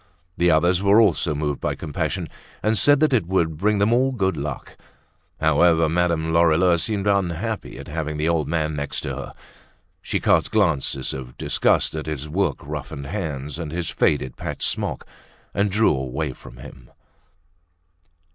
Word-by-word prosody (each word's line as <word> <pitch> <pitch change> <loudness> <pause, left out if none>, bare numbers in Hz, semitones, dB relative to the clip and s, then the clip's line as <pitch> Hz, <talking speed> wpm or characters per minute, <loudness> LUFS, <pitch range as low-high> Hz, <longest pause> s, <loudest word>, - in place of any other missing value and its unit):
The 85 0 +2
others 85 +3 +3
were 100 +2 +5
also 90 -7 +2
moved 75 -1 -2
by - - -1
compassion 75 -4 -3 0.4
and 110 +1 +2
said 145 +8 +5
that 155 -3 +3
it 105 -9 +2
would 85 -4 +1
bring 105 +6 +1
them 100 +3 +3
all 130 +2 +3
good 95 -8 0
luck. 70 -2 -6 0.6
However, 80 +1 +4
Madame 80 -1 0
Lorilleux 85 +1 +4
seemed 100 +3 -1
unhappy 100 - -1
at 70 - -9
having 75 -1 -4
the 75 +1 0
old 80 -4 +1
man 80 -1 -1
next 70 -1 -3
to - - -4
her. - - -7 0.7
She - - -2
cast - - +2
glances 70 -1 0
of 65 -2 -8
disgust - - +1
at 80 0 -5
his 75 -1 -4
work 95 +6 0
roughened 70 - -6
hands 75 -4 -4
and 80 -3 -5
his 85 0 -3
faded, 65 -4 0
patched - - -5
smock, - - -3 0.5
and 100 +2 +1
drew 105 -4 +3
away 65 +2 -3
from - - -14
him. - - -13
80 Hz, 165 wpm, -22 LUFS, 75-95 Hz, 0.7 s, were